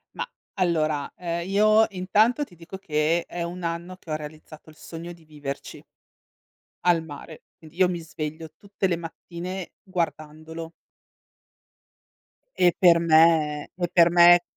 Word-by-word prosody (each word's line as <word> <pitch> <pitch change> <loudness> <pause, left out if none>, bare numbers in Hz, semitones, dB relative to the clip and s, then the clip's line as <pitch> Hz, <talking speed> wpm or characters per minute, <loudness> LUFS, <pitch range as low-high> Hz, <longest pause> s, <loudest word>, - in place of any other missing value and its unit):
Mah 485 - -4 0.3
allora, 155 -6 0
ehm, 170 0 -3
io 215 +2 +5
intanto 210 +8 +2
ti 195 -11 -12
dico 170 +3 -10
che 165 -2 0
è 175 - -6
un 175 +1 -6
anno 170 +2 -4
che 170 - -11
ho - - 0
realizzato 155 +1 -10
il 155 - -16
sogno 165 +2 -9
di 170 -2 -15
viverci 145 -3 -7 1.0
al 175 -2 +4
mare. 155 0 -10
Quindi 160 +1 -16
io 185 -1 +5
mi 175 -1 -3
sveglio 155 0 -6
tutte 200 -1 -2
le 175 -2 0
mattine 170 +2 -7
guardandolo. 160 -2 -5 1.8
E 175 -1 +4
per 170 -2 +6
me 160 -2 +3
e 175 -1 -1
per 170 -1 +5
me 175 0 +7
170 Hz, 140 wpm, -25 LUFS, 155-180 Hz, 1.8 s, me